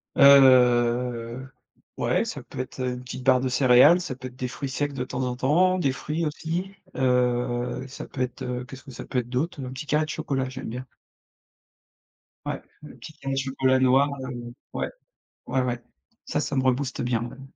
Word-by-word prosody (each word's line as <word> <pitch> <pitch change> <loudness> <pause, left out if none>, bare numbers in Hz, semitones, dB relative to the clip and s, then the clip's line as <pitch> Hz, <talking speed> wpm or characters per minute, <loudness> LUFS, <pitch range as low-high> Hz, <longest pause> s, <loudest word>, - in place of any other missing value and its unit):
Heu, 125 -2 +5 0.5
ouais, - - +1
ça - - -5
peut - - -10
être 130 +1 -5
une 125 -1 -2
petite 125 0 -7
barre 130 -1 +5
de 130 - -1
céréales, 130 +6 +6
ça 160 -8 -4
peut 130 0 -7
être 125 - -13
des 130 -1 -3
fruits 140 +2 -5
secs 145 +2 -2
de 130 -2 -3
temps 125 +1 -4
en 125 -1 -2
temps, 175 +9 +3
des 140 -6 +2
fruits 150 +5 -3
aussi, 165 +5 -3 0.2
heu 125 -1 +1
et - - -9
ça 135 - -8
peut 130 - -6
être 125 0 -3
qu'est-ce 130 0 -10
que 135 - -11
ça - - -8
peut 130 - -1
être 120 -1 -5
d'autre? 140 +5 -2
Un 125 - -6
petit 130 +4 -6
carré 150 +1 +1
de - - -12
chocolat, 135 -4 -2
j'aime 130 0 -7
bien. 125 +3 -6 1.6
Ouais, - - -3 0.2
le 150 - -11
petit 155 - -11
carré 135 -3 -4
de 135 - 0
chocolat 130 -1 +1
noir, 130 +2 +4
heu, 120 -2 -6 0.2
ouais. - - -1 0.6
Ouais, 130 - 0
ouais, 125 -1 -1 0.5
ça, - - -1
ça - - -2
me 130 - +2
rebooste 130 0 0
bien 120 -2 0
même. 135 +3 -7
130 Hz, 200 wpm, -25 LUFS, 125-140 Hz, 1.6 s, céréales